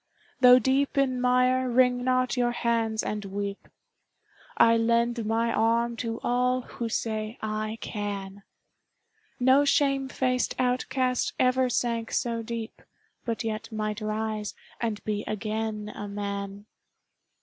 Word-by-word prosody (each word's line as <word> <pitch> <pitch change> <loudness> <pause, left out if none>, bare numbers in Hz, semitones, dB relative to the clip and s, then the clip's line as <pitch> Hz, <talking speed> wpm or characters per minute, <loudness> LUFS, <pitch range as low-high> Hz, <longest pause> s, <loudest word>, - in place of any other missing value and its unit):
Though 250 -1 +8
deep 270 +3 +1
in 255 -2 +2
mire, 250 +1 +3
wring 250 0 +3
not 255 0 +1
your 240 -1 +1
hands 230 -2 0
and 210 0 -3
weep; 200 +1 -5 0.9
I 230 0 +6
lend 235 0 +1
my 230 +1 +1
arm 230 +2 +2
to 230 -1 -3
all 250 +1 +1
who 235 -1 -5
say 220 0 -2
"I 215 0 -3
can!" 200 -2 -5 1.0
No 260 +3 +5
shame 275 -2 +2
faced 255 -1 0
outcast 255 0 0
ever 255 0 +3
sank 230 -2 -1
so 230 -1 0
deep, 230 0 -6 0.4
But 230 -1 -2
yet 225 +1 -4
might 215 0 -3
rise 215 -1 -3 0.3
and 225 -3 -2
be 210 -1 -2
again 215 0 -3
a 205 - -6
man 200 0 -5
230 Hz, 125 wpm, -27 LUFS, 215-250 Hz, 1.0 s, Though